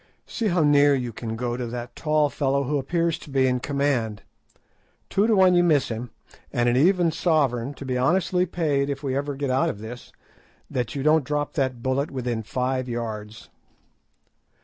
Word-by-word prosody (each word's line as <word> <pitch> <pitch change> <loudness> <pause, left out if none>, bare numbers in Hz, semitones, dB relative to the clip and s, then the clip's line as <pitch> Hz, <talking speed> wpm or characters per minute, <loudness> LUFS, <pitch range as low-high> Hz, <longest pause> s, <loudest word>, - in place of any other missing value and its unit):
"See 230 - -2
how 175 -4 +2
near 145 -1 +5
you 125 -3 -3
can 110 +1 -5
go 120 +1 -2
to 125 -1 -4
that 120 0 -6
tall 150 -2 +1
fellow 140 -1 0
who 145 +2 0
appears 165 +4 0
to - - -13
be 135 -1 +2
in 125 -1 +1
command. 125 -7 -1 0.9
Two 200 +3 +2
to 225 - +3
one 185 -2 +5
you 175 0 +4
miss 150 -6 +3
him, 115 +2 -5 0.4
and 120 0 +1
an 120 - +3
even 175 +4 +3
sovereign, 140 -6 0
to 140 - -9
be 130 -1 -1
honestly 180 +5 +2
paid 145 -5 0
if 140 0 -4
ever 140 +2 -1
we - - -10
get 140 -2 -1
out 130 +1 +2
of - - -4
this, 110 +3 -9 0.6
that 125 0 -2
you 135 - -2
don't 155 0 +4
drop 145 +2 -2
the 135 -3 +1
bullet 130 +4 -2
within 125 -4 -3
five 130 +3 -2
yards." 110 -2 -6
135 Hz, 190 wpm, -24 LUFS, 125-150 Hz, 0.9 s, near